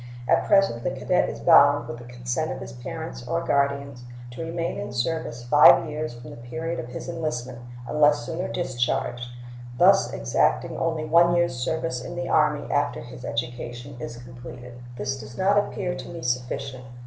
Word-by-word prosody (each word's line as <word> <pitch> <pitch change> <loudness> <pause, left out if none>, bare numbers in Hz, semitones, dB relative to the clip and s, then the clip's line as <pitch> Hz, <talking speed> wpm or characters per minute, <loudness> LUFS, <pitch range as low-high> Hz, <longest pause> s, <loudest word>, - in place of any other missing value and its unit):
At - - +3
present 195 - +3
the - - +1
cadet - - +1
is - - -7
bound, - - +6
with 120 0 -8
consent 125 +5 -3
of 130 - -5
his - - -8
parents 125 +1 -7
or 165 +3 -1
guardians, 140 -3 0 0.3
to 125 +7 -6
remain 165 +1 -3
in 100 - -5
service 120 -2 -2
five 135 +2 +7
years 150 -4 -4
from 120 0 -10
the - - -10
period 160 +8 -4
of - - -5
his 125 - -7
enlistment, 130 -8 -4 0.3
unless 150 -4 +3
sooner 165 +7 -3
discharged, 120 -5 -1 0.5
thus - - +5
exacting - - +1
only 160 -2 -1
one 170 +2 +5
year's 170 -6 +2
service 125 0 -2
in 175 - -7
the 175 0 -3
Army 150 -1 +2
after 145 0 0
his 120 +1 -10
education 120 +2 -5
is 120 0 -6
completed. 125 0 -10 0.2
This 135 +1 -3
does 115 +1 -10
not 200 +2 +4
appear 185 -3 -2
to - - -7
me 170 -1 -7
sufficient. 125 +1 -3
135 Hz, 170 wpm, -25 LUFS, 120-160 Hz, 0.5 s, five